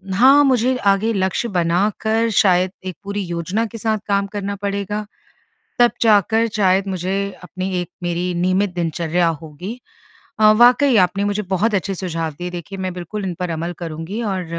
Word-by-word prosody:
हाँ, 270 Hz, +7 st, +6 dB
मुझे 255 Hz, -2 st, +2 dB
आगे 200 Hz, +3 st, +3 dB
लक्ष्य 190 Hz, +4 st, 0 dB
बनाकर 205 Hz, +6 st, +1 dB
शायद 185 Hz, -3 st, +3 dB
एक 185 Hz, -3 st, -5 dB
पूरी 200 Hz, 0 st, -3 dB
योजना 175 Hz, +6 st, -2 dB
के 230 Hz, +1 st, -8 dB
साथ 220 Hz, 0 st, 0 dB
काम 200 Hz, 0 st, +1 dB
करना 200 Hz, 0 st, -4 dB
पड़ेगा। 200 Hz, +1 st, -3 dB, 0.7 s
तब 240 Hz, 0 st, +6 dB
जाकर 220 Hz, +1 st, +4 dB
शायद 195 Hz, -1 st, +2 dB
मुझे 185 Hz, 0 st, -2 dB, 0.3 s
अपनी 185 Hz, +1 st, -5 dB
एक 175 Hz, -, -7 dB
मेरी 175 Hz, +1 st, -1 dB
नियमित 185 Hz, +2 st, +1 dB
दिनचर्या 170 Hz, 0 st, 0 dB
होगी। 180 Hz, -, -8 dB, 0.6 s
अ, 215 Hz, 0 st, +7 dB
वाक़ई 245 Hz, +4 st, +5 dB
आपने 190 Hz, +2 st, +2 dB
मुझे 205 Hz, +1 st, 0 dB
बहुत 205 Hz, +3 st, +1 dB
अच्छे 195 Hz, +1 st, -1 dB
सुझाव 165 Hz, -4 st, -3 dB
दिए। 180 Hz, 0 st, -4 dB
देखिए, 180 Hz, +3 st, -7 dB
मैं 185 Hz, -1 st, -3 dB
बिल्कुल 180 Hz, +3 st, -5 dB
इन 180 Hz, -, -2 dB
पर 180 Hz, -1 st, -2 dB
अमल 165 Hz, +2 st, -3 dB
करूँगी 165 Hz, +6 st, -5 dB
और 190 Hz, -4 st, -2 dB
195 Hz, 165 wpm, -20 LUFS, 180-215 Hz, 0.7 s, अ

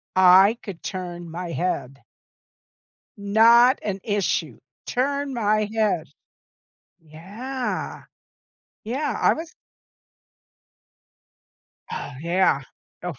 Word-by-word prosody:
I 190 Hz, +4 st, +6 dB
could 190 Hz, -5 st, -8 dB
turn 175 Hz, -2 st, -6 dB
my 175 Hz, +1 st, -6 dB
head. 140 Hz, -6 st, -3 dB, 1.2 s
Not 230 Hz, +5 st, +5 dB
an 195 Hz, -2 st, -3 dB
issue. 205 Hz, -3 st, -1 dB, 0.3 s
Turn 280 Hz, +1 st, -1 dB
my 215 Hz, -2 st, +1 dB
head. 210 Hz, -8 st, +1 dB, 1.0 s
Yeah. 205 Hz, -, -5 dB, 0.8 s
Yeah, 255 Hz, +3 st, -2 dB
I -, -, +4 dB
was 325 Hz, +1 st, -8 dB, 2.4 s
Oh, -, -, -5 dB
yeah. 170 Hz, -3 st, +2 dB, 0.5 s
Oof. 165 Hz, -8 st, -5 dB
200 Hz, 80 wpm, -23 LUFS, 175-235 Hz, 2.4 s, I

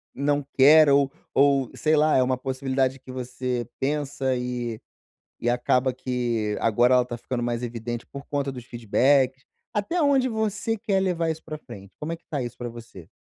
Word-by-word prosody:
não 145 Hz, 0 st, 0 dB
quer, 150 Hz, +2 st, +8 dB
ou 140 Hz, -1 st, +4 dB, 0.2 s
ou 140 Hz, -2 st, +3 dB
sei 155 Hz, 0 st, +2 dB
lá, 155 Hz, +1 st, +4 dB
é -, -, +5 dB
uma 130 Hz, 0 st, 0 dB
possibilidade 130 Hz, 0 st, -1 dB
que 130 Hz, 0 st, -11 dB
você 125 Hz, -1 st, -3 dB
pensa, 135 Hz, -2 st, -1 dB
e 125 Hz, -2 st, -3 dB, 0.6 s
e 120 Hz, -, -1 dB
acaba 125 Hz, +1 st, +2 dB
que 120 Hz, -4 st, -2 dB
agora 120 Hz, +3 st, +4 dB
ela 125 Hz, -1 st, +4 dB
tá 120 Hz, -1 st, -6 dB
ficando 120 Hz, 0 st, -3 dB
mais 120 Hz, 0 st, -2 dB
evidente, 120 Hz, 0 st, -5 dB
por 140 Hz, +1 st, -9 dB
conta 140 Hz, -1 st, -1 dB
dos 125 Hz, -2 st, -9 dB
feedbacks? 130 Hz, +3 st, +2 dB, 0.3 s
Até 270 Hz, -, 0 dB
onde 270 Hz, -3 st, +3 dB
você 220 Hz, 0 st, -1 dB
quer 200 Hz, -3 st, 0 dB
levar 170 Hz, -3 st, 0 dB
isso 160 Hz, 0 st, -5 dB
pra 155 Hz, -1 st, -6 dB
frente? 100 Hz, -8 st, -12 dB
Como 155 Hz, +2 st, -3 dB
é -, -, -3 dB
que -, -, -30 dB
tá 145 Hz, -4 st, -1 dB
isso 120 Hz, -, -6 dB
pra 120 Hz, -1 st, -5 dB
você? 115 Hz, -7 st, -11 dB
130 Hz, 185 wpm, -25 LUFS, 120-150 Hz, 0.6 s, quer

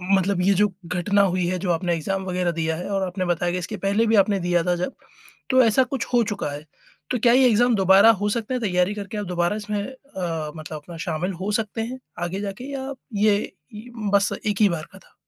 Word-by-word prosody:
मतलब 190 Hz, -1 st, +1 dB
ये 195 Hz, +2 st, +4 dB
जो 205 Hz, +2 st, +4 dB, 0.2 s
घटना 190 Hz, +4 st, +2 dB
हुई 185 Hz, -2 st, +1 dB
है 185 Hz, +1 st, 0 dB
जो 180 Hz, -1 st, -1 dB
आपने 170 Hz, +1 st, 0 dB
एक्ज़ाम 190 Hz, +4 st, -2 dB
वगैरह 180 Hz, -1 st, 0 dB
दिया 160 Hz, -1 st, -1 dB
है 175 Hz, -, -5 dB
और 195 Hz, -1 st, 0 dB
आपने 185 Hz, +1 st, -3 dB
बताया 175 Hz, 0 st, 0 dB
कि -, -, 0 dB
इसके 195 Hz, +5 st, -5 dB
पहले 200 Hz, +4 st, +1 dB
भी 225 Hz, -, +3 dB
आपने 200 Hz, 0 st, +3 dB
दिया 175 Hz, -1 st, +1 dB
था 180 Hz, +1 st, +1 dB
जब, 180 Hz, +8 st, -3 dB, 0.6 s
तो 260 Hz, 0 st, +5 dB
ऐसा 230 Hz, +3 st, +4 dB
कुछ 255 Hz, -1 st, -3 dB
हो 240 Hz, -, +5 dB
चुका 200 Hz, -8 st, -3 dB
है। 145 Hz, +1 st, -6 dB, 0.5 s
तो 250 Hz, -, +1 dB
क्या 235 Hz, +1 st, +4 dB
ये 260 Hz, +1 st, +6 dB
एक्ज़ाम 240 Hz, +2 st, +3 dB
दोबारा 195 Hz, +3 st, +6 dB
हो 205 Hz, -, +1 dB
सकते 230 Hz, +3 st, -2 dB
हैं, 250 Hz, -, -2 dB
तैयारी 180 Hz, -2 st, +1 dB
करके, 210 Hz, +1 st, -6 dB
आप 205 Hz, -, -3 dB
दोबारा 175 Hz, +2 st, 0 dB
इसमें 210 Hz, -1 st, -3 dB
अ, 180 Hz, -, -5 dB
मतलब 155 Hz, 0 st, -7 dB
अपना 165 Hz, +3 st, -11 dB
शामिल 175 Hz, +4 st, -2 dB
हो 200 Hz, +2 st, -1 dB
सकते 220 Hz, +1 st, -5 dB
हैं, 250 Hz, +3 st, -5 dB, 0.2 s
आगे 180 Hz, +3 st, -3 dB
जाके 205 Hz, +7 st, -6 dB
या 270 Hz, 0 st, -4 dB, 0.3 s
ये 210 Hz, -1 st, +2 dB, 0.6 s
बस 200 Hz, 0 st, +3 dB
1 210 Hz, 0 st, 0 dB
ही 205 Hz, -, +6 dB
बार 165 Hz, -3 st, -4 dB
का -, -, -12 dB
था? -, -, -24 dB
195 Hz, 230 wpm, -23 LUFS, 175-215 Hz, 0.6 s, ये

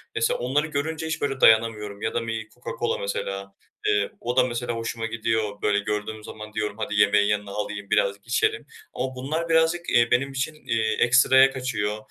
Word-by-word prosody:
Mesela 115 Hz, -, +1 dB
onları 140 Hz, +6 st, 0 dB
görünce 155 Hz, +2 st, -3 dB
hiç, 160 Hz, -, -3 dB
böyle, 135 Hz, -1 st, -2 dB
dayanamıyorum 110 Hz, -2 st, +3 dB
ya 110 Hz, -, -2 dB
da 115 Hz, -1 st, -2 dB
bir 110 Hz, -1 st, -4 dB
Coca-Cola 120 Hz, 0 st, -3 dB
mesela, 100 Hz, 0 st, -4 dB, 0.3 s
eee, 105 Hz, -1 st, +2 dB
o 120 Hz, +2 st, -3 dB
da 130 Hz, -, +7 dB
mesela 120 Hz, -1 st, -2 dB
hoşuma 115 Hz, 0 st, -4 dB
gidiyor. 110 Hz, -2 st, -2 dB
Böyle, 105 Hz, -1 st, +2 dB
gördüğüm 105 Hz, +1 st, -4 dB
zaman 110 Hz, 0 st, -9 dB
diyorum, 105 Hz, -1 st, -2 dB
"Hadi, 105 Hz, -1 st, -3 dB
yemeğin 105 Hz, 0 st, +4 dB
yanına 105 Hz, -1 st, -1 dB
alayım, 100 Hz, 0 st, -5 dB
biraz 100 Hz, -2 st, +2 dB
içerim." 430 Hz, -, 0 dB, 0.3 s
ama 130 Hz, 0 st, -3 dB
bunlar 155 Hz, +6 st, -3 dB
birazcık, 165 Hz, +1 st, +2 dB
eee, 120 Hz, 0 st, +3 dB
benim 135 Hz, +3 st, +2 dB
için, 140 Hz, +3 st, -2 dB
eee, 110 Hz, -1 st, +1 dB
ekstraya 130 Hz, +2 st, +6 dB
kaçıyor. 110 Hz, -6 st, -2 dB
115 Hz, 180 wpm, -25 LUFS, 105-130 Hz, 0.3 s, da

